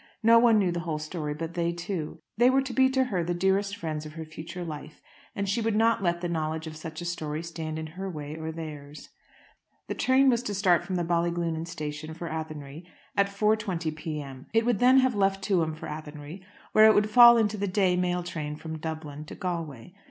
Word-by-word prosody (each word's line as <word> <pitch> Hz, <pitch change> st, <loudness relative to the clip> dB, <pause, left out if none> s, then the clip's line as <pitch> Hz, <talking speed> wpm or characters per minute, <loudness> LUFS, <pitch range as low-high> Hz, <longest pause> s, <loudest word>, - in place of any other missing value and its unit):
No 230 Hz, +1 st, +7 dB
one 230 Hz, -2 st, +5 dB
knew 190 Hz, -4 st, +2 dB
the 175 Hz, -, -2 dB
whole 165 Hz, -3 st, -3 dB
story 155 Hz, -1 st, -4 dB
but 165 Hz, +2 st, -5 dB
they 170 Hz, -1 st, 0 dB
two. 170 Hz, -2 st, -4 dB, 0.2 s
They 240 Hz, +3 st, +5 dB
were 265 Hz, +1 st, +3 dB
to 265 Hz, -2 st, -5 dB
be 260 Hz, 0 st, +4 dB
to 265 Hz, 0 st, +2 dB
her 195 Hz, -9 st, -1 dB
the 175 Hz, +1 st, -2 dB
dearest 195 Hz, +3 st, +1 dB
friends 155 Hz, -3 st, -4 dB
of 155 Hz, 0 st, -9 dB
her 160 Hz, 0 st, -7 dB
future 165 Hz, +3 st, -7 dB
life, 155 Hz, -1 st, -8 dB, 0.4 s
and 200 Hz, 0 st, -2 dB
she 215 Hz, +5 st, 0 dB
would 225 Hz, -1 st, 0 dB
not 225 Hz, 0 st, +3 dB
let 175 Hz, -2 st, 0 dB
the 175 Hz, -, -1 dB
knowledge 160 Hz, -1 st, -2 dB
of 155 Hz, -1 st, -7 dB
such 160 Hz, +1 st, -7 dB
a -, -, -5 dB
story 160 Hz, -2 st, -3 dB
stand 160 Hz, -2 st, -5 dB
in 160 Hz, -, -4 dB
her 185 Hz, +5 st, -6 dB
way 150 Hz, -3 st, -6 dB
or 160 Hz, 0 st, -5 dB
theirs. 150 Hz, -2 st, -8 dB, 0.8 s
The -, -, -2 dB
train 265 Hz, +1 st, +3 dB
was 240 Hz, -3 st, +4 dB
to 210 Hz, -4 st, -4 dB
start 185 Hz, -3 st, +3 dB
from 190 Hz, -, -4 dB
the 175 Hz, -, 0 dB
Ballyglunin 170 Hz, -1 st, -1 dB
station 155 Hz, -1 st, -6 dB
for 170 Hz, 0 st, -6 dB
Athenry 155 Hz, -1 st, -6 dB, 0.3 s
at 200 Hz, -1 st, +3 dB
4.20 200 Hz, -6 st, 0 dB
p.m. 145 Hz, -4 st, -6 dB
It 225 Hz, 0 st, +4 dB
would 240 Hz, -5 st, +1 dB
then 255 Hz, +2 st, +6 dB
have 260 Hz, -1 st, +2 dB
left 195 Hz, -1 st, +1 dB
Tuam 170 Hz, -6 st, +1 dB
for 155 Hz, -, -9 dB
Athenry, 150 Hz, +3 st, -8 dB, 0.3 s
where 215 Hz, -, +7 dB
it 220 Hz, -, +6 dB
would 210 Hz, +1 st, +2 dB
fall 240 Hz, 0 st, +9 dB
into 215 Hz, -2 st, +1 dB
the 200 Hz, 0 st, -1 dB
day 185 Hz, -1 st, +2 dB
mail 180 Hz, 0 st, 0 dB
train 155 Hz, -4 st, -4 dB
from 160 Hz, +1 st, -7 dB
Dublin 155 Hz, -2 st, -6 dB
to -, -, -9 dB
Galway. 165 Hz, -5 st, -5 dB
170 Hz, 220 wpm, -27 LUFS, 155-200 Hz, 0.8 s, fall